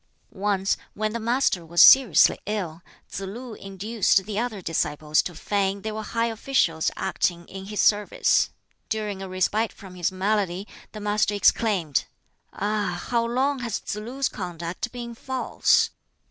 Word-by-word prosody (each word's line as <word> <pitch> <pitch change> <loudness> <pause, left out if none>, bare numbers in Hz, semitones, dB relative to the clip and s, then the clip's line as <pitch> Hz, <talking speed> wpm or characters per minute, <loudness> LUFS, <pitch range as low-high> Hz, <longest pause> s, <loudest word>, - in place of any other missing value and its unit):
Once 195 -1 0 0.2
when 215 0 -1
the 235 - -2
Master 230 -5 +1
was 170 +1 -2
seriously 260 -9 +7
ill, 185 -6 -3 0.3
Tsz - - -6
lu 220 +5 -7
induced 195 0 0
the 210 0 -3
other 235 -3 -2
disciples 155 -3 0
to 175 - -7
feign 195 +2 -1
they 220 - -3
were 215 0 -4
high 230 +2 -1
officials 220 -8 +1
acting 170 -1 -1
in 195 0 -8
his 210 +1 -5
service. 205 -1 +3 0.4
During 210 -3 -3
a 190 - -6
respite 205 +4 0
from 190 -2 -13
his 180 -1 -1
malady 195 0 -1 0.2
the 215 - -8
Master 210 0 +1
exclaimed, 195 -7 +2 0.5
"Ah! 205 -3 -2
how 235 -1 +2
long 260 +4 0
has 235 -4 -2
Tsz - - -5
lu's 250 +6 -2
conduct 175 +3 -5
been 240 -1 -6
false? 260 +2 +1
205 Hz, 150 wpm, -25 LUFS, 185-225 Hz, 0.5 s, seriously